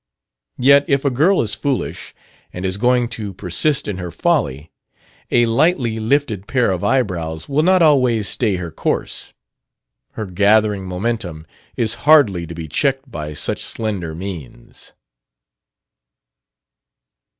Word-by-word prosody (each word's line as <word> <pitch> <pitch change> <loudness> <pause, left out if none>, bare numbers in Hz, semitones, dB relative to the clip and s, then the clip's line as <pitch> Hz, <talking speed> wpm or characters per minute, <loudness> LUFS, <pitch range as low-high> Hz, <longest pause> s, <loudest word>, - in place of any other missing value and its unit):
Yet 140 +3 +5
if 140 0 +1
a 140 - +2
girl 160 +9 +3
is 105 - 0
foolish, 140 -3 -3 0.4
and 90 +1 -6
is 95 +1 -1
going 125 +2 +2
to 105 -5 -6
persist 105 - 0
in 100 -3 -4
her 90 -1 -5
folly, 75 -1 -1 0.6
a 120 0 +3
lightly 115 -2 +1
lifted 110 -4 0
pair 125 -6 +1
of 90 -2 -3
eyebrows 85 -11 -1
will 145 +2 +1
not 185 +1 +4
always 125 -8 +3
stay 110 -3 0
her 90 -2 -5
course. - - -3 0.8
Her 110 - -5
gathering 100 +1 +2
momentum 90 -4 -3 0.3
is 115 -1 +1 0.2
hardly 105 - +5
to 85 - -8
be 80 -1 -6
checked 135 - -1
by 75 -5 -6
such - - -2
slender 100 -8 -3
means. 85 -9 -9
110 Hz, 130 wpm, -19 LUFS, 90-130 Hz, 0.8 s, Yet